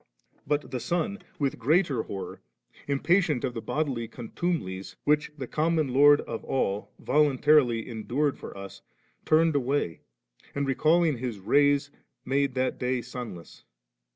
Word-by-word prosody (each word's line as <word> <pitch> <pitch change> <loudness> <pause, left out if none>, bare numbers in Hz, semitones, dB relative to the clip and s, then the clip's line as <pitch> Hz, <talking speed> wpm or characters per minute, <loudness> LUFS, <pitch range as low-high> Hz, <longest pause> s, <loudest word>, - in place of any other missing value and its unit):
But 145 0 -1
the 130 - -2
sun, 175 - -2 0.2
with 140 -4 -1
greater 145 0 +2
horror, 95 -3 -7 0.5
im 140 -1 -1
patient 175 -7 +2
of 130 -2 -1
the 115 - -5
bodily 135 -6 -2
contumelies, 115 - -4
which 150 0 +2
the 135 - -4
common 155 +1 0
Lord 145 +2 +6
of 115 - -6
all 105 -6 -1
voluntarily 135 -4 +3
endured 130 +5 -1
for - - -9
us, 100 0 -9 0.4
turned 160 0 +3
away, 135 - 0 0.6
and 140 0 0
recalling 155 +1 +2
his 120 -4 -4
rays 140 +7 +2 0.3
made 135 0 0
that 130 0 -1
day 125 -1 -1
sunless. 120 -10 -9
140 Hz, 135 wpm, -27 LUFS, 120-150 Hz, 0.6 s, Lord